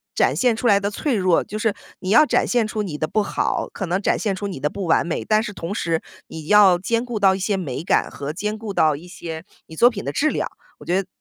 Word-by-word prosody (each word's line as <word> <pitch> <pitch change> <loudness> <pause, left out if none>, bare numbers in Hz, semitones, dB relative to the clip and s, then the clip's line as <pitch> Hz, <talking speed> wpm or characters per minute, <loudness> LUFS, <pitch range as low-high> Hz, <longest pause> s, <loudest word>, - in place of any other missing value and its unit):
展 - - +3
现 245 -3 +2
出 235 - -6
来 200 -4 +5
的 200 - -1
脆 270 +6 -2
弱 185 -4 +2
就 215 +2 -6
是 220 -2 +1 0.3
你 185 - -5
要 300 +9 +6
展 - - +1
现 240 -2 +2
出 215 0 -3
你 160 -7 -5
的 155 - -1
不 215 - +1
好， 205 - -1
可 195 - -4
能 180 +3 0
展 - - +1
现 210 -3 -1
出 200 +2 -4
你 160 -9 -7
的 150 - +1
不 195 +2 -5
完 165 - +3
美， 170 - -3
但 215 0 +2
是 215 - -5
同 190 0 -5
时 165 -4 -1 0.3
你 160 -1 -9
要 205 -4 +6
兼 230 +5 0
顾 235 -3 -4
到 195 -1 +4
一 - - -5
些 195 +1 0
美 150 -6 -4
感， - - +1
和 140 +1 -5
兼 210 +6 -3
顾 215 -2 -6
到 155 -4 +3
一 160 +5 -11
些 160 -2 -7 0.2
你 160 - -11
作 240 +8 +6
品 205 - -7
的 140 - -3
质 310 - +2
量。 - - -2 0.3
我 - - -13
觉 185 +3 +1
得 - - -27
195 Hz, 300 characters per minute, -22 LUFS, 170-215 Hz, 0.3 s, 要